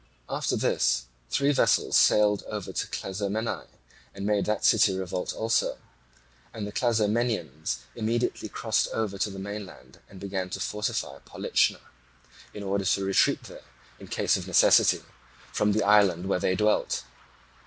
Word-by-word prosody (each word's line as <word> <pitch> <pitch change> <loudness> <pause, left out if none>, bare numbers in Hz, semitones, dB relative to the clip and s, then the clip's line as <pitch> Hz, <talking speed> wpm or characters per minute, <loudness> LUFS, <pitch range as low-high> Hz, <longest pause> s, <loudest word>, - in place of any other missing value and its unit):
After - - -1
this - - +1 0.2
three 140 +1 +2
vessels 145 - +2
sailed 105 -1 +4
over 105 -3 -5
to - - -2
Clazomenae, 100 +4 -3 0.5
and 100 - -5
made 105 -1 +1
that 105 -1 -1
city 100 -4 +4
revolt 90 -1 -3
also; 115 +1 0 0.7
and 110 -2 -5
the 105 - -6
Clazomenians 110 - 0
immediately 115 +2 -2
crossed - - 0
over 105 -3 -2
to 105 - 0
the 95 - -8
mainland 100 0 -8
and 95 - -12
began 95 -1 -4
to 95 - -5
fortify 105 +1 -3
Polichna, - - 0 0.7
in 105 - -8
order 100 0 -1
to 95 +1 +1
retreat 95 - +2
there, - - -11 0.4
in - - -11
case - - +1
of - - -7
necessity, - - +5 0.5
from 105 - +2
the 105 +1 +1
island 100 -4 +4
where 95 - +1
they 95 - +1
dwelt. 105 +1 +1
100 Hz, 145 wpm, -27 LUFS, 95-110 Hz, 0.7 s, necessity